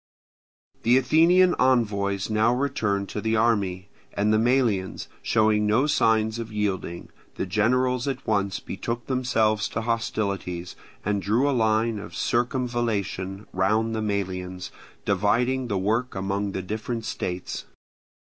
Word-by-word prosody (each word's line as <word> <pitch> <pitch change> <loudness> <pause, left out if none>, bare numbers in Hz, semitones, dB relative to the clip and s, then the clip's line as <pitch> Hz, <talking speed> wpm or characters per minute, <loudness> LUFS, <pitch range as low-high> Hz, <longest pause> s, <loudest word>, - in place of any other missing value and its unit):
The 120 +3 +4
Athenian 170 +7 +5
envoys 100 -6 +2
now 110 +2 +2
returned 110 -7 -1
to 105 - -4
the 110 +1 0
army; 100 -5 +1 0.3
and 105 +1 +2
the 110 - +4
Melians 115 -6 +1
showing 110 -1 +2
no 115 +6 +3
signs 110 -6 +2
of 115 -1 -6
yielding, 95 -5 -3 0.3
the - - -2
generals 125 +6 +1
at 135 -2 -3
once 100 -3 0
betook 115 +5 -5
themselves 110 -5 +1
to 115 - -3
hostilities, 100 -6 -2 0.3
and 100 0 0
drew 115 +8 +2
a - - +2
line 110 -1 +1
of - - -9
circumvallation 115 -6 -1
round 110 +5 +1
the 110 - -1
Melians, 95 -3 -3 0.3
dividing 120 +6 +1
the 100 -4 -1
work 115 +6 0
among 100 +1 -2
the 95 - -3
different 110 +3 -4
states. 90 -4 -4
110 Hz, 130 wpm, -25 LUFS, 100-120 Hz, 0.3 s, Athenian